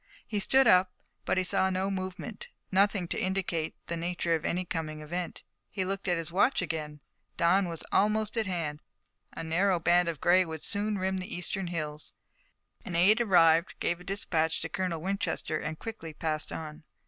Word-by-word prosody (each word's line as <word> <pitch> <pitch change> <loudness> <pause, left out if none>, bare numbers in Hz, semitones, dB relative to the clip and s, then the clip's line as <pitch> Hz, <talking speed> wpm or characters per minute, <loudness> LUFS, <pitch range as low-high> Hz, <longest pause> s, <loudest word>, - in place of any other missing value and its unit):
He 210 - -2
stood 265 +7 +4
up, 185 -4 +5 0.3
but - - +1
he 185 - +3
saw 190 +1 +2
no 190 +1 -1
movement, 190 - -5 0.2
nothing 195 -1 +3
to - - -1
indicate 185 -4 -1
the 170 - -3
nature 170 0 -1
of 160 -2 0
any 180 +2 0
coming 155 -2 -4
event. 170 +3 -5 0.3
He 190 -2 -2
looked 195 +1 -3
at 175 -1 +2
his 165 0 -3
watch 200 +9 +3
again. 155 -5 -4 0.4
Dawn 180 +3 +3
was 165 -2 -6
almost 215 +2 +2
at 225 -2 0
hand. 160 -5 -3 0.5
A - - -5
narrow 175 +3 +2
band 175 +1 +3
of 160 -4 -4
gray 185 +2 +5
would 160 -3 -7
soon 205 +1 0
rim 190 0 -1
the 185 - -6
eastern 180 +1 -2
hills. 155 -3 -4 0.7
An 185 -7 -5
aide 205 +7 +5
arrived, 170 -5 +4
gave 170 0 0
a - - -12
dispatch 175 -4 0
to 165 - -3
Colonel 180 -3 -2
Winchester, 190 -4 -2
and 155 +1 -4
quickly 165 -8 -7
passed 155 -1 -2
on. 155 0 -6
180 Hz, 185 wpm, -29 LUFS, 165-195 Hz, 0.7 s, up